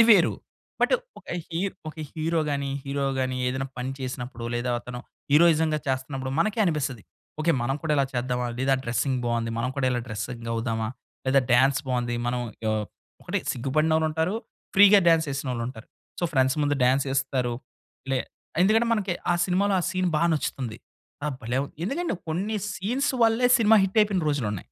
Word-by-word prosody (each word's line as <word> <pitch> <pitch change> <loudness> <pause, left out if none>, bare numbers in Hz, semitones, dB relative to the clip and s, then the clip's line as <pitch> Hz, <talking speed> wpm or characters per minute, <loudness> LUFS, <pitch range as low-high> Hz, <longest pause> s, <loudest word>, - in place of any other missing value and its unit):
అది 230 - +9
వేరు. 195 -6 +6 0.5
బట్టు - - +4 0.2
ఒక - - -19 0.2
హీర్ 180 +4 -2
ఒక 155 - -8 0.2
హీరో‌గాని, 155 -4 -1
హీరో‌గాని 135 -2 -1
ఏదన్నా 130 +1 -2
పని 130 +2 -2
చేసినప్పుడో, 125 -2 -5
లేదా 120 +1 -1
అతను 125 0 -7 0.3
హీరోయిజం‌గా 160 -1 +5
చేస్తున్నప్పుడు 130 0 -2
మనకే 215 +2 +1
అనిపిస్తది, 145 - -1 0.4
ఓకే, 170 - +2
మనం 135 +3 0
గూడా 155 -2 0
ఇలా 140 - +3
చేద్దామా? 125 0 -1
లేదా 135 +1 +2
డ్రెస్సింగ్ 125 +2 0
బావుంది, 115 -1 0
మనం 115 +2 0
కూడా 135 - +1
ఇలా 125 - 0
డ్రెస్సింగ్ 115 +2 -5
అవుదామా? 115 -1 -1 0.4
లేదా 135 +1 +5
డాన్స్ 135 +3 +4
బావుంది, 120 -1 0
మనం 125 0 0 0.3
ఆహ్, 110 -1 0 0.4
ఒకటి - - -1
సిగ్గుపడినొళ్ళుంటారు, 160 - +1 0.4
ఫ్రీగా 205 +1 +8
డాన్స్ 165 -1 +4
చేసినోళ్ళుంటారు. 125 -4 -4 0.3
సో - - -1
ఫ్రెండ్స్ 130 0 +3
ముందు 145 0 +2
డాన్స్ 135 +2 +3
ఎస్తారు, 130 -3 0 0.6
లే 135 - +2 0.4
ఎందుకంటే, 220 +4 +4
మనకి 205 -5 0 0.2
ఆ - - +2
సినిమాలో, 195 +2 +2
ఆ - - -3
సీన్ 185 -1 0
బా 155 - +1
నచ్చుతుంది. 130 -6 -2 0.5
ఆహ్, 150 -3 -1
భలే! 120 +3 -1
వుం 140 - -7
ఎందుకంటే, 330 - -1
కొన్ని 195 +7 -1 0.2
సీన్స్ 250 +9 0
వల్లే, 230 +2 +3
సినిమా 220 0 +6
హిట్టయిపోయిన 195 -2 +2
రోజులున్నాయి. 110 -9 -1
140 Hz, 155 wpm, -26 LUFS, 125-170 Hz, 0.6 s, అది